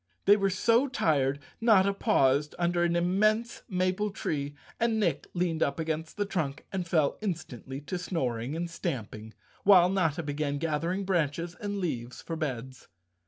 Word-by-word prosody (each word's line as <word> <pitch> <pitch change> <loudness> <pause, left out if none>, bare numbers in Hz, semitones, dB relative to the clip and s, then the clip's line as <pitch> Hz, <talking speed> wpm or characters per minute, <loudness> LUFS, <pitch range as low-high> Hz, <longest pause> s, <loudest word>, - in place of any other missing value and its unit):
They 205 - +8
were 195 -1 +1
so 230 +7 +3
tired 145 - +1 0.2
Notta 200 -4 +5
paused 150 - +2
under 175 0 +1
an 170 0 +2
immense 215 +6 +1
maple 185 +2 0
tree 145 -6 -3 0.2
and 230 -1 +2
Nick 210 - 0
leaned 175 -2 0
up 140 - +1
against 160 +1 -3
the 205 - 0
trunk 160 -8 -3
and 185 -2 -2
fell 155 -4 +1
instantly 140 - -5
to 180 +5 -4
snoring 130 -7 -2
and 170 +1 -2
stamping, 110 - -5 0.3
while 185 -3 +7
Notta 170 -4 +1
began 145 -1 -2
gathering 165 +5 -1
branches 170 -2 0
and 205 +2 -4
leaves 125 -10 -3
for 165 - -5
beds. 130 -5 -5
170 Hz, 155 wpm, -29 LUFS, 145-195 Hz, 0.3 s, They